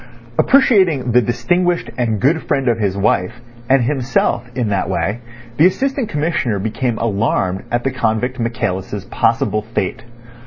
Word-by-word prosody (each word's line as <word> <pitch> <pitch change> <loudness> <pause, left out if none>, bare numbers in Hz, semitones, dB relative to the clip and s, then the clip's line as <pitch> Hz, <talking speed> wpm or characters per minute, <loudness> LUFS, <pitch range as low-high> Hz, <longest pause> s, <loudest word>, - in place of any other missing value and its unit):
Appreciating 190 - +4
the 125 +2 +5
distinguished 175 - 0
and 115 -4 -1
good 150 - +2
friend 135 -4 0
of 115 -2 +2
his 100 -2 -1
wife, 95 -2 +1 0.4
and 135 -1 +4
himself, 125 -2 0
in 120 -4 -1
that 100 -2 -1
way, 105 +4 -1 0.4
the 160 - +7
Assistant 265 +5 -1
Commissioner 145 -7 -1
became 110 +4 -2
alarmed 100 -4 -1
at 120 0 -1
the 135 - 0
convict 125 +1 -1
Michaelis' 100 -4 -3
possible 105 - +1
fate. 105 -4 -3
120 Hz, 145 wpm, -18 LUFS, 105-145 Hz, 0.4 s, the